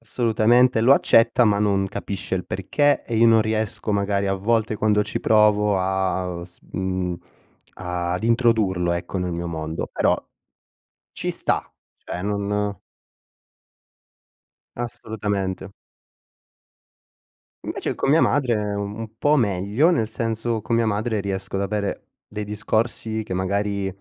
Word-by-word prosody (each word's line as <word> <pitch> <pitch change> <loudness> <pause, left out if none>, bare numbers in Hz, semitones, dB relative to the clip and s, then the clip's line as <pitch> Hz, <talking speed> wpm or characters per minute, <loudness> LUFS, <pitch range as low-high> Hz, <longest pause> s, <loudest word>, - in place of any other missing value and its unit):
Assolutamente, 115 +1 +3
lo 125 +4 +6
accetta, 115 -1 +4
ma 105 -2 +3
non 100 -2 +1
capisce 95 -1 -4
il 90 - -2
perché, 145 +10 +1
e 115 - -3
io 115 - +5
non 115 -1 +6
riesco, 110 -1 -1
magari, 100 0 0
a 95 - +1
volte 110 +2 0
quando 105 0 +2
ci 105 - -3
provo 105 -2 +4
a 95 -2 -1
s 85 - -17
mhmm, 95 -1 -2 0.6
ad 90 +1 -3
introdurlo, 110 -7 +2
ecco, 85 +2 -3
nel 90 -1 -2
mio 85 +1 -3
mondo. 80 -1 -4
Però - - +2 1.0
ci - - -3
sta, - - -1 0.3
cioè 90 - -6
non 105 0 -1 2.0
Assolutamente. 100 -5 -4 1.9
Invece - - -3
con - - 0
mia 160 +3 +5
madre, 125 -6 +2
un 100 +2 -4
po' 150 +1 +3
meglio, 105 - +2
nel 115 -10 0
senso, 115 0 -2
con 115 - -1
mia 115 0 +3
madre 110 +1 -1
riesco 95 -1 -4
ad 95 - 0
avere 100 0 -3 0.2
dei 105 0 -6
discorsi 110 +1 -2
che, 95 - -5
magari, 100 +1 -1
105 Hz, 130 wpm, -23 LUFS, 95-115 Hz, 2.0 s, lo